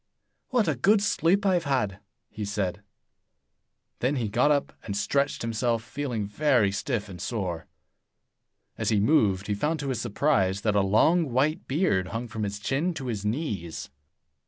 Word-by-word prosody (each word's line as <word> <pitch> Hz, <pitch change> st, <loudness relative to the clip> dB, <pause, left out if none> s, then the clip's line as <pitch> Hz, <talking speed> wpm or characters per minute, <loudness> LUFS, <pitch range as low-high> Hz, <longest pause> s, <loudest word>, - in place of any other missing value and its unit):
"What 245 Hz, -6 st, +2 dB
a 155 Hz, -, +2 dB
good 195 Hz, -, +4 dB
sleep 200 Hz, 0 st, +2 dB
I 190 Hz, -, +4 dB
have 175 Hz, -2 st, +1 dB
had!" 105 Hz, -9 st, 0 dB, 0.3 s
he 105 Hz, -, -5 dB
said. 100 Hz, -1 st, -2 dB, 1.2 s
Then 130 Hz, +4 st, +1 dB
he 115 Hz, -5 st, -1 dB
got 120 Hz, +7 st, +3 dB
up 145 Hz, -1 st, +1 dB
and 100 Hz, -2 st, -4 dB
stretched 140 Hz, +7 st, 0 dB
himself, 115 Hz, 0 st, 0 dB
feeling 120 Hz, -4 st, -3 dB
very 120 Hz, -2 st, +2 dB
stiff 105 Hz, +2 st, -2 dB
and 90 Hz, -2 st, -9 dB
sore. 90 Hz, -8 st, -3 dB, 1.1 s
As -, -, 0 dB
he 110 Hz, -, +3 dB
moved, 100 Hz, -6 st, +3 dB
he 105 Hz, -, -1 dB
found, 150 Hz, +10 st, -1 dB
to 140 Hz, -, -3 dB
his 130 Hz, -, -1 dB
surprise, 100 Hz, -5 st, +1 dB
that 105 Hz, -1 st, +1 dB
a 100 Hz, -, +4 dB
long 140 Hz, -, +3 dB
white 150 Hz, +9 st, +1 dB
beard 130 Hz, -, +1 dB
hung 115 Hz, +4 st, -4 dB
from 110 Hz, -1 st, -6 dB
his 100 Hz, -1 st, -2 dB
chin 145 Hz, +11 st, -1 dB
to 135 Hz, -, -5 dB
his 110 Hz, -5 st, -3 dB
knees. 105 Hz, -, -3 dB
115 Hz, 170 wpm, -27 LUFS, 100-145 Hz, 1.2 s, good